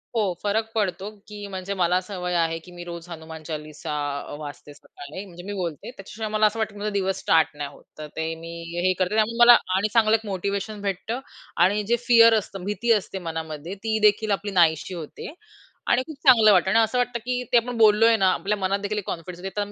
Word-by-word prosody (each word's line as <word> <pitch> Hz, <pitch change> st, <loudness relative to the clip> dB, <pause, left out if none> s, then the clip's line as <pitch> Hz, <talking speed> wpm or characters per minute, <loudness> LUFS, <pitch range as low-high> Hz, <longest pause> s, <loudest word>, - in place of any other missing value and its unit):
हो, 205 Hz, -5 st, +1 dB
फरक 210 Hz, +2 st, +1 dB
पडतो 200 Hz, -2 st, -1 dB, 0.2 s
की 210 Hz, -1 st, -8 dB
म्हणजे 190 Hz, +1 st, -4 dB
मला 180 Hz, -1 st, +2 dB
सवय 180 Hz, -3 st, -4 dB
आहे 165 Hz, -1 st, +1 dB
की 180 Hz, -, -13 dB
मी 175 Hz, 0 st, -9 dB
रोज 170 Hz, 0 st, -8 dB
हनुमान 160 Hz, -1 st, -9 dB
चालीसा 155 Hz, 0 st, -6 dB, 0.3 s
अ, -, -, -8 dB
वाचते 145 Hz, 0 st, -9 dB
सकाळी, 145 Hz, +5 st, -10 dB
म्हणजे 175 Hz, -2 st, -12 dB
मी 205 Hz, +2 st, -5 dB
बोलते. 175 Hz, +1 st, -5 dB
त्याच्याशिवाय 215 Hz, 0 st, -7 dB
मला 215 Hz, 0 st, +2 dB
असं 215 Hz, +2 st, +1 dB
वाटतं 220 Hz, -1 st, -2 dB
की 205 Hz, -, -11 dB
माझा 210 Hz, +1 st, -2 dB
दिवस 195 Hz, -1 st, -1 dB
स्टार्ट 160 Hz, -2 st, +2 dB
नाही 145 Hz, -1 st, -4 dB
होत. -, -, -18 dB
तर 155 Hz, 0 st, -7 dB
ते 160 Hz, 0 st, -2 dB
मी 165 Hz, -, -7 dB, 0.4 s
हे 185 Hz, -, +3 dB
करते. 185 Hz, +2 st, 0 dB
त्यामुळे 220 Hz, +1 st, +1 dB
मला 240 Hz, 0 st, +10 dB, 0.2 s
आणि 200 Hz, +3 st, +1 dB
चांगलं 220 Hz, -1 st, +4 dB
एक 225 Hz, 0 st, -3 dB
मोटिव्हेशन 200 Hz, +2 st, -3 dB
भेटतं 200 Hz, +4 st, -3 dB, 0.5 s
आणि 205 Hz, +3 st, +1 dB
जे 235 Hz, -, +3 dB
फिअर 230 Hz, -2 st, +7 dB
असतं, 195 Hz, -2 st, -9 dB
भीती 210 Hz, +4 st, -1 dB
असते 200 Hz, -2 st, -2 dB
मनामध्ये 160 Hz, 0 st, -6 dB
तीदेखील 215 Hz, -1 st, +2 dB
आपली 200 Hz, +1 st, -1 dB
नाहीशी 170 Hz, -1 st, +2 dB
होते 170 Hz, -, -8 dB, 0.6 s
आणि 240 Hz, -, +4 dB
खूप 315 Hz, -, -8 dB
चांगलं 230 Hz, -6 st, +7 dB
वाटतं 190 Hz, -, +4 dB
आणि 225 Hz, -, +4 dB
असं 225 Hz, +2 st, +1 dB
वाटतं 245 Hz, -1 st, 0 dB
की 250 Hz, 0 st, -1 dB
ते -, -, +8 dB
आपण 240 Hz, +1 st, -1 dB
बोललोय 225 Hz, +1 st, +6 dB
ना, 190 Hz, -3 st, +3 dB
आपल्या 210 Hz, +2 st, -1 dB
मनातदेखील 200 Hz, +2 st, -1 dB
एक 205 Hz, -, -3 dB
कॉन्फिडन्स 175 Hz, +1 st, -6 dB
देतं 205 Hz, +2 st, -4 dB
200 Hz, 210 wpm, -24 LUFS, 175-215 Hz, 0.6 s, मला